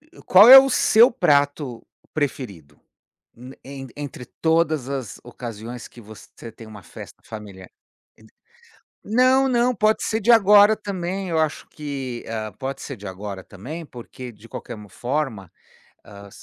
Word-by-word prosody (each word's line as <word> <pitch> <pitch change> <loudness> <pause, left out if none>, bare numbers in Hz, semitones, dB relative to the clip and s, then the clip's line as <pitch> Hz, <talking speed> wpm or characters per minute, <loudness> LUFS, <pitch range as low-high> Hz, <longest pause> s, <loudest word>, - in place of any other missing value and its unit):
Eh, 315 +3 -20
qual 200 +5 +8
é 265 - +13
o 270 0 +4
seu 235 0 +5
prato 145 - 0 0.3
preferido? 100 - -5 0.8
En 135 -1 -9
entre 145 -3 -7 0.2
todas 160 -4 +1
as 135 -6 -6
ocasiões 120 -1 -8
que 120 - -15
você 110 +1 -13
tem 115 - -13
uma 105 -2 -12
festa - - -13
familiar? 100 -4 -10 0.5
E 110 - -20
de 110 - -21 0.7
não, 255 +4 +3
não, 245 0 +2
pode 215 +1 +1
ser 220 0 -1
de 230 +3 +4
agora 210 -1 +6
também, 190 -2 -5
eu 160 - 0
acho 155 -1 -2
que, 135 -5 -6
hã, 110 -1 -5
pode 135 +1 -5
ser 140 - -7
de 105 -1 -11
agora, 95 0 -7
também, 150 - -9
porque 125 0 -10
de 110 +1 -17
qualquer 120 - -8
uma 105 - -12
m - - -22
forma, 120 - -4 0.6
hã, 100 0 -13
135 Hz, 155 wpm, -22 LUFS, -, 0.8 s, é